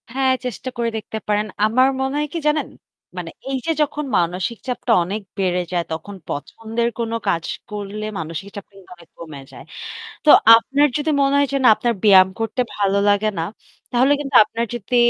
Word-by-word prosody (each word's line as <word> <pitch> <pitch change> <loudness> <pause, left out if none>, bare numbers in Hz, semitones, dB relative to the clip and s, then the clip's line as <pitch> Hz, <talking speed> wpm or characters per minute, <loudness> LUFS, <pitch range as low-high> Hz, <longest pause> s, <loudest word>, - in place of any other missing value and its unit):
হ্যাঁ, 265 0 +2
চেষ্টা 250 +1 -5
করে 235 -1 0
দেখতে 220 0 -6
পারেন। 210 0 0 0.2
আমার 255 +4 +4
মনে 265 +1 -1
হয় 300 - -1
কি 335 - -2
জানেন? 300 0 +1 0.5
মানে - - -5 0.2
এই 270 - -1
যে 330 - +1
যখন 300 0 -1
মানসিক 180 +6 -1
চাপটা 250 -1 -2
অনেক 200 +5 -4 0.2
বেড়ে 180 -2 0
যায় 175 -1 0
তখন 160 +5 -6
পছন্দের 225 +10 -3
কোন 230 -1 -2 0.2
কাজ 170 -3 0 0.3
করলে 210 +1 -5
মানসিক 165 +4 -6
চাপ 200 - -7
কিন্তু 195 -2 -18
অনেক 170 -2 -19
কমে 155 -4 -9
যায়। - - -12 0.6
তো - - +4 0.3
আপনার 275 +6 +2
যদি 300 +1 -1
মনে 275 0 +2
হয় 285 0 +3
যে - - +2
না - - +6
আপনার 240 +1 0
ব্যায়াম 190 -3 +7
করতে 225 +3 -1
ভালো 200 -1 +1
লাগে 205 +1 +2
না, - - 0 0.5
তাহলে 255 +3 +3
কিন্তু 275 -2 -4
আপনার 230 +2 -3
যদি 240 +2 -3
220 Hz, 185 wpm, -20 LUFS, 195-260 Hz, 0.6 s, ব্যায়াম